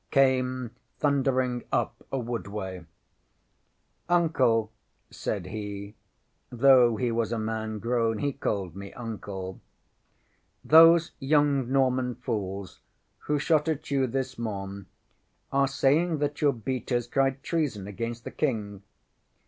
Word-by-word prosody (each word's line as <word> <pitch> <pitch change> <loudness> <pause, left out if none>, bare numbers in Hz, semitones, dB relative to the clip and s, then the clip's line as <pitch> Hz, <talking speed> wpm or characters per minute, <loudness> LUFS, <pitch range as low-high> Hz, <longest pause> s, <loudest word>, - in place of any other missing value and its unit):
] - - -46
came 130 -3 +2 0.3
thundering 130 -4 +1
up - - 0 0.2
a 135 - -1
woodway. 105 -7 -4 1.3
ŌĆśŌĆ£Uncle, 170 -2 +3
ŌĆØ 115 -7 +2 0.4
said - - -3
he 100 -1 -6 0.6
(though 125 -1 +5
he 120 +1 -1
was 115 0 -1
a 115 - -1
man 110 0 -3
grown, 115 0 0
he 140 +5 -1
called 100 -9 -3
me 100 0 -8
Uncle), 100 -5 -6 1.1
ŌĆ£those 165 +1 +7
young 140 -2 +2
Norman 130 -2 +2
fools 100 -5 -4 0.5
who 150 - +2
shot 150 +1 +2
at 155 -2 -3
you 135 -2 +2
this 130 0 -3
morn 100 -3 -5 0.6
are 140 0 +3
saying 155 +5 +2
that 145 0 -2
your 145 -2 +4
beaters 120 +1 -2
cried 135 +1 0
treason 145 - -1
against 115 +4 -5
the - - -7
King. 105 -9 -2
125 Hz, 125 wpm, -27 LUFS, 110-140 Hz, 1.3 s, ŌĆ£those